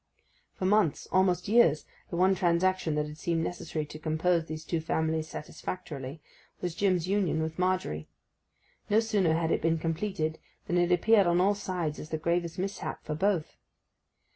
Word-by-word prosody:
For 185 - -3
months—almost 185 -1 +2
years—the 200 -8 +2
one 185 +2 +4
transaction 175 -2 +1
that 150 0 0
had 150 +1 -9
seemed 165 -1 0
necessary 160 -3 -3
to 155 +1 -10
compose 160 +2 +1
these 155 0 -6
two 165 -2 -1
families 160 0 -1
satisfactorily 150 -3 -6 0.4
was 175 -2 -3
Jim's 180 -2 +1
union 190 -5 +1
with 160 +2 -5
Margery. 180 - -1 0.8
No 210 +1 +5
sooner 205 -8 +2
had 165 0 0
it - - +1
been 165 +1 +2
completed 165 0 -2 0.3
than 175 +1 +1
it 175 0 +2
appeared 200 +2 +5
on 175 0 +3
all 195 +3 +4
sides 180 -6 -3
as 155 - -8
the 160 - -1
gravest 170 +2 -1
mishap 195 +2 -4
for 155 - -2
both. 175 0 0
170 Hz, 160 wpm, -29 LUFS, 160-185 Hz, 0.8 s, No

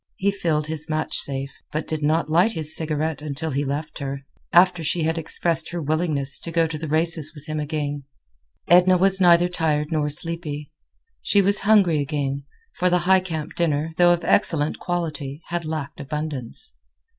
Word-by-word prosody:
He 200 +1 +1
filled 165 -6 -1
his 155 -1 -3
match 155 0 -2
safe, 135 0 +1 0.2
but 155 +1 -3
did 155 -1 -3
not 155 +2 +1
light 175 +8 +3
his 160 -1 +3
cigarette 155 -1 -2
until 155 +1 -4
he 140 +2 -1
left 145 +2 -4
her, 140 -1 -5 0.3
after 180 -1 +4
she 165 +2 0
had 160 +1 0
expressed 165 0 0
her 175 - -4
willingness 150 -3 -1
to - - -7
go 165 0 +2
to 160 0 -4
the 160 - -5
races 160 0 +2
with 145 0 -12
him 155 -1 -4
again. 145 -2 -3 0.6
Edna 180 +1 +6
was 190 +1 +3
neither 175 -1 +6
tired 155 -3 -1
nor 150 -2 0
sleepy. 150 -1 -3 0.5
She 205 - +3
was 200 +1 +2
hungry 190 -8 +5
again, 140 -1 -3 0.3
for 180 0 +3
the 180 0 +2
Highcamp 185 -5 +1
dinner, 160 -2 0
though 175 0 +6
of 175 -1 0
excellent 150 -2 +1
quality, 160 -4 -4
had 170 -1 -3
lacked 155 -2 -5
abundance. 150 - -4
155 Hz, 175 wpm, -23 LUFS, 150-175 Hz, 0.6 s, Edna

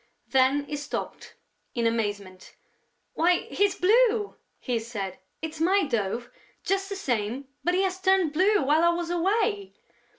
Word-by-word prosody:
Then 270 +2 +3
he 295 - -4
stopped, 290 +1 -6 0.4
in 235 -1 0
amazement: 205 -5 -3 0.6
"Why, 350 +2 +3
he's 400 -1 +2
blue!" 435 +1 +3 0.2
he 245 -3 -2
said. 205 -5 -6 0.2
"It's 320 0 -5
my 385 +4 +3
dove, 235 - -2 0.3
just 390 0 -1
the 400 - -4
same, 255 - -2
but 355 +1 +1
he 380 - +2
has 375 -1 -2
turned 375 -5 +3
blue 390 +6 +3
while 300 +4 +3
I 340 - +5
was 340 0 -2
away!" 400 +3 0
325 Hz, 145 wpm, -26 LUFS, 240-385 Hz, 0.6 s, I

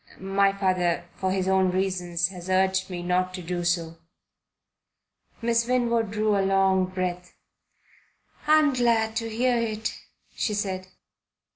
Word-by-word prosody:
"My 195 +1 +2
father, 185 -3 0
for 190 0 -2
his 190 -1 -1
own 190 -1 +3
reasons, 180 -2 0
has 180 -1 -9
urged 190 0 +2
me 175 -1 -5
not 185 +1 0
to 180 - -7
do 175 +1 -3
so." 165 -1 -1 1.4
Miss 230 0 +1
Winwood 235 -3 +1
drew 215 0 +1
a 200 - +2
long 190 -1 +2
breath. 180 -1 -4 1.1
"I'm 305 -2 +5
glad 230 -3 +1
to 230 -1 -2
hear 245 +3 +1
it," 220 -1 -2 0.4
she 210 - -1
said. 190 -2 -3
190 Hz, 135 wpm, -25 LUFS, 185-220 Hz, 1.4 s, I'm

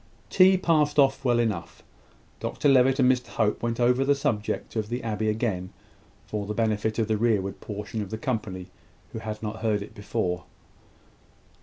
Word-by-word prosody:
Tea 190 0 +6
passed 155 -5 +2
off 135 -1 +4
well 120 -2 +3
enough. 110 -7 -2 0.6
Dr - - -1
Levitt 135 0 +5
and 130 -2 +5
Mr 125 -1 -1
Hope 105 -2 0
went 115 0 -2
over 125 +2 +3
the 140 +1 +3
subject 110 -6 -2
of 110 -1 -2
the 120 +1 -3
abbey 110 -1 -1
again, 105 -5 -2 0.5
for 105 -2 -4
the 105 - -3
benefit 110 -1 0
of 110 -2 +1
the 110 -1 +1
rearward 105 -4 0
portion 105 +1 -5
of 100 - -5
the 110 - -4
company, 100 -7 -4 0.4
who - - -4
had 110 0 -6
not 110 +1 -4
heard 110 -2 0
it 105 - -12
before. 100 -4 -3
110 Hz, 175 wpm, -26 LUFS, 105-125 Hz, 0.6 s, Tea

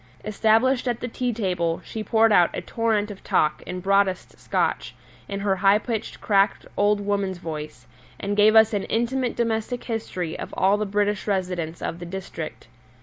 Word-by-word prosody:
Established 225 +5 +2
at 240 -2 -1
the 245 - -4
tea 250 +1 -2
table, 180 -7 -1
she 220 - -5
poured 225 0 +3
out 175 -4 +5
a - - -3
torrent 220 -3 -1
of 200 - -11
talk 150 0 +1
in 180 0 -5
broadest 195 -1 +1
Scotch, - - -1 0.3
in 200 0 -4
her 195 -1 +1
high 195 +2 +5
pitched 225 -1 -4
cracked 200 -1 +2
old 205 0 +3
woman's 200 -2 -1
voice, 155 -6 -7 0.3
and 200 +1 -2
gave 210 +1 +5
us 220 0 +6
an 200 -2 -1
intimate 240 +2 -1
domestic 230 +1 -1
history 185 -8 -4
of - - -7
all 195 +2 +4
the 210 0 -2
British 205 0 0
residents 180 -4 -2
of 165 - -3
the 175 - -7
district. 175 -6 -7
205 Hz, 175 wpm, -24 LUFS, 185-220 Hz, 0.3 s, us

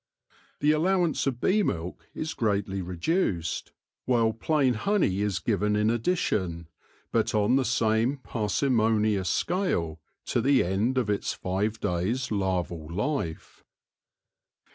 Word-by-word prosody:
The 150 +1 +4
allowance 170 0 +1
of 125 -3 -1
bee 205 +10 +3
milk 90 - -3
is 155 0 -3
greatly 100 -3 -1
reduced, 90 - -1 0.3
while 115 -3 +2
plain 135 +2 +1
honey 120 - +1
is 105 -2 0
given 105 -1 0
in 105 +1 +2
addition, 100 - -1 0.4
but - - +1
on 105 +4 +3
the 135 - +3
same 115 +2 +1
parsimonious 110 -4 +1
scale, 90 - 0 0.3
to 120 - 0
the 135 +2 +4
end 105 +8 0
of 115 -5 +1
its 100 - -1
five 100 +4 -2
days* 110 +10 -1
larval 90 -5 -1
life. 105 - -3
110 Hz, 120 wpm, -27 LUFS, 95-135 Hz, 0.4 s, The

